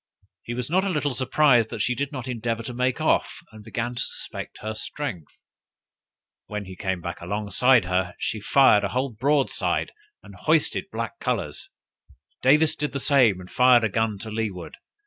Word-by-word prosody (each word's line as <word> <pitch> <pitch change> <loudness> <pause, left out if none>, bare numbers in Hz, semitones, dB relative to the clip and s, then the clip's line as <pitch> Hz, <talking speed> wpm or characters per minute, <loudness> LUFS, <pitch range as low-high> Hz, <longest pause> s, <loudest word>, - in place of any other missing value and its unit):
He 120 - -6
was 125 -1 -3
not 185 +4 +2
a 200 - -1
little 145 -5 -1
surprised 130 -2 +3
that 105 - -2
she 125 - +1
did 140 +3 -3
not 130 -3 -6
endeavor 115 -2 -3
to 125 - -6
make 125 +1 0
off, - - +1
and 110 -1 -13
began 120 +3 -3
to 120 - -4
suspect - - -5
her 110 0 -4
strength. 110 - -6 1.0
When 105 -1 -5
he 95 0 -9
came 95 -1 -3 0.2
alongside 105 +6 +2
of - - -7
her, 90 -1 0
she 110 - -3
fired 105 -1 +5
a - - +1
whole 130 +4 -1
broadside, 135 +5 0 0.3
and - - -13
hoisted - - +1
black - - -5
colors. - - -3 0.7
Davis 150 +4 +4
did 150 0 -3
the 140 - -2
same, 130 -9 +4
and 90 0 -12
fired 125 -2 +5
a 110 - +2
gun 110 +1 0
to 110 - -7
leeward. 105 -5 -4
120 Hz, 180 wpm, -24 LUFS, 105-135 Hz, 1.0 s, fired